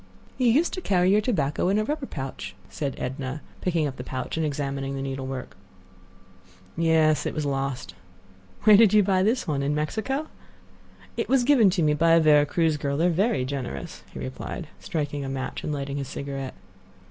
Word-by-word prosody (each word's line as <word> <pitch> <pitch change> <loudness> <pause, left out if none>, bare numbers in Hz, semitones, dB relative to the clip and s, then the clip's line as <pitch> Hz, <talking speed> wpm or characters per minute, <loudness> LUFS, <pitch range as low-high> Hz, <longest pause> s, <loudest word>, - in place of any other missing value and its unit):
"You 250 - +3
used 290 +9 +3
to 370 - -4
carry 185 - +3
your 210 +1 +4
tobacco 175 - 0
in 200 - +2
a 215 - +2
rubber 290 +3 -3
pouch," 135 -2 -6
said 140 -4 -3
Edna, 130 +2 -4 0.2
picking 170 -4 +1
up 135 -2 -4
the 125 - -5
pouch 130 0 -4
and 160 - 0
examining 140 -2 -2
the 135 - -3
needlework. 135 -1 -5 1.2
"Yes; 160 -2 +3
it - - -4
was 155 -2 -1
lost." 135 -7 -2 0.7
"Where 210 0 +8
did 215 -1 +6
you 210 - +6
buy 190 -1 +2
this 225 +6 +1
one? 145 -3 0
In 145 +2 0
Mexico?" 225 - -2 0.9
"It - - -2
was 265 -2 +4
given 245 -6 +5
to 180 -2 +1
me 150 -1 +3
by 165 +2 +4
a 165 - +7
Vera 150 -2 +5
Cruz 165 -2 +1
girl; 140 -1 -2
they 165 - +2
are - - +4
very 195 - +1
generous," 130 - -5
he - - -10
replied, 65 0 -6
striking 145 -3 -3
a 135 - -4
match 135 0 -4
and - - -2
lighting 140 -1 -3
his 140 -2 -3
cigarette. 135 -1 -5
150 Hz, 195 wpm, -25 LUFS, 135-190 Hz, 1.2 s, Where